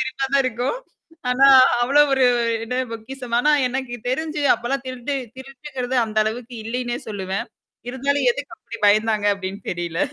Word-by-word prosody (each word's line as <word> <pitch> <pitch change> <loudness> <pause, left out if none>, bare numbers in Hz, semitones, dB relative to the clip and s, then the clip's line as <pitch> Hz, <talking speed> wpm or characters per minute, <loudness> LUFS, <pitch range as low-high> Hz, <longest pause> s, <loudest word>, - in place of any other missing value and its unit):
சிரிப்பாத்தான் 270 +1 0
இருக்கும். 250 - -1 0.5
ஆனா 270 +2 +5 0.4
அவ்வளவு 285 +3 +4
ஒரு 265 - +3 0.4
என்ன 250 +2 -4 0.2
பொக்கிஷமானா, 245 +3 -1 0.2
எனக்குத் 245 -2 -5
தெரிஞ்சு 305 +3 -2
அப்பல்லாம் 265 +4 -3
திருட்டு 255 +2 -4 0.2
திருட்டுங்கிறது 265 -1 -5
அந்த 215 -1 -3
அளவுக்கு 235 +3 -5
இல்லைன்னே 240 +1 -3
சொல்லுவேன். 195 -2 -4 0.4
இருந்தாலும் 280 - 0
எதுக்கு - - -7
அப்படி - - -10
பயந்தாங்க 215 0 +3
அப்படின்னு 195 +1 -6
தெரியல. 170 -1 -4
250 Hz, 130 wpm, -22 LUFS, 225-270 Hz, 0.5 s, ஆனா